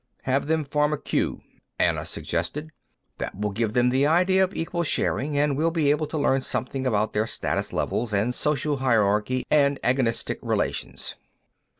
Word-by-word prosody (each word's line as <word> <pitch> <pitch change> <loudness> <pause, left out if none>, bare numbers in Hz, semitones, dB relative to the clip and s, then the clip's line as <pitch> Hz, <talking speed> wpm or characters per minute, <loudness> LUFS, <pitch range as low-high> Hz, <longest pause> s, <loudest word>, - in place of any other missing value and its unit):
"Have 135 +2 0
them 160 -1 +1
form 150 +1 +1
a - - 0
queue," - - -1 0.4
Anna - - +1
suggested. 150 +2 -3 0.5
"That - - -5
will 105 0 -1
give 110 +1 -1
them 125 +1 +3
the 135 +3 +3
idea 185 +4 +4
of 190 +1 -2
equal 170 +1 -2
sharing, 145 -2 0
and 145 -1 +2
we'll 160 +4 +2
be 160 -4 +2
able 150 +1 0
to 155 - -4
learn 135 -2 +2
something 130 +1 -2
about 110 -2 +1
their 110 +1 +1
status - - -2
levels 115 -1 -1
and 105 +4 +1
social 150 +1 0
hierarchy 115 -1 +1
and 140 -2 +3
agonistic 125 -1 0
relations." - - -2
140 Hz, 170 wpm, -25 LUFS, 120-150 Hz, 0.5 s, idea